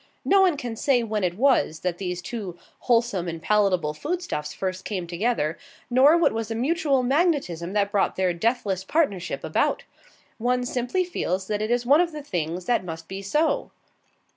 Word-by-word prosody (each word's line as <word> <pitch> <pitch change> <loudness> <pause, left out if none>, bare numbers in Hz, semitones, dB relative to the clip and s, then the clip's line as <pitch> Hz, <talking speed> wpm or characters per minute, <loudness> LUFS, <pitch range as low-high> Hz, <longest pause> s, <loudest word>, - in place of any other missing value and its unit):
No 395 0 +5
one 360 -6 +3
can 245 -5 -5
say 245 +1 +2
when 215 -2 -2
it 180 0 -1
was 250 - +2
that 180 -1 -2
these 180 -2 -4
two 195 -6 -6 0.2
wholesome 230 -7 +1
and 165 -1 -4
palatable 185 -5 +2
food 345 - -3
stuffs 150 - -4
first 185 +1 -4
came 190 -4 -3
together, 170 -3 -1 0.3
nor 275 +6 +6
what 340 - +3
was 225 -1 -3
the 225 - -4
mutual 275 +1 +1
magnetism 260 - 0
that 200 -1 +1
brought 205 -2 +1
their 185 -2 +1
deathless 195 0 -1
partnership 200 - -1
about. - - 0 0.6
One 250 +2 +1
simply 250 +9 -1
feels 190 - -2
that 210 +1 -2
it 215 - -1
is 240 0 +1
one 285 +6 +6
of 340 -2 -1
the 300 -1 -6
things 175 - -3
that 240 -5 +1
must 165 -2 -7
be 195 +1 -6
so. 305 - 0
215 Hz, 185 wpm, -25 LUFS, 180-265 Hz, 0.6 s, nor